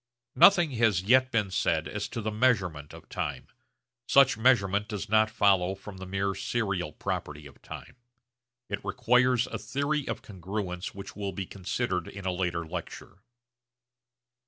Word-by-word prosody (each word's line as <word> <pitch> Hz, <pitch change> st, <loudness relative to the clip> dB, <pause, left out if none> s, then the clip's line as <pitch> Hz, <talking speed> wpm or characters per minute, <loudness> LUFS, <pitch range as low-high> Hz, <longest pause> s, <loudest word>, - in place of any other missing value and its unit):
Nothing 175 Hz, -6 st, +6 dB
has 105 Hz, -6 st, +3 dB
yet 130 Hz, +5 st, +4 dB
been 105 Hz, -4 st, 0 dB
said -, -, 0 dB
as -, -, -4 dB
to 115 Hz, -, -5 dB
the 110 Hz, -, -1 dB
measurement 100 Hz, -, +1 dB
of -, -, -13 dB
time. -, -, -4 dB, 0.6 s
Such 140 Hz, -1 st, +6 dB
measurement 105 Hz, -4 st, +2 dB
does 105 Hz, -3 st, -5 dB
not 110 Hz, 0 st, +4 dB
follow 95 Hz, -3 st, +2 dB
from 100 Hz, 0 st, -11 dB
the 95 Hz, 0 st, -8 dB
mere 95 Hz, +1 st, -1 dB
serial 95 Hz, -8 st, -2 dB
property 75 Hz, +1 st, -5 dB
of 70 Hz, -1 st, -15 dB
time; -, -, -10 dB, 0.7 s
it 100 Hz, -, -4 dB
requires 125 Hz, 0 st, +2 dB
a -, -, -6 dB
theory 140 Hz, +1 st, -2 dB
of -, -, -4 dB
congruence 95 Hz, -1 st, -5 dB
which 100 Hz, -, -9 dB
will 100 Hz, -1 st, -4 dB
be 95 Hz, +2 st, -4 dB
considered 95 Hz, -1 st, -3 dB
in 100 Hz, -1 st, -9 dB
a 95 Hz, -, +1 dB
later 90 Hz, -2 st, -2 dB
lecture. 85 Hz, +3 st, -8 dB
100 Hz, 155 wpm, -28 LUFS, 90-120 Hz, 0.7 s, Nothing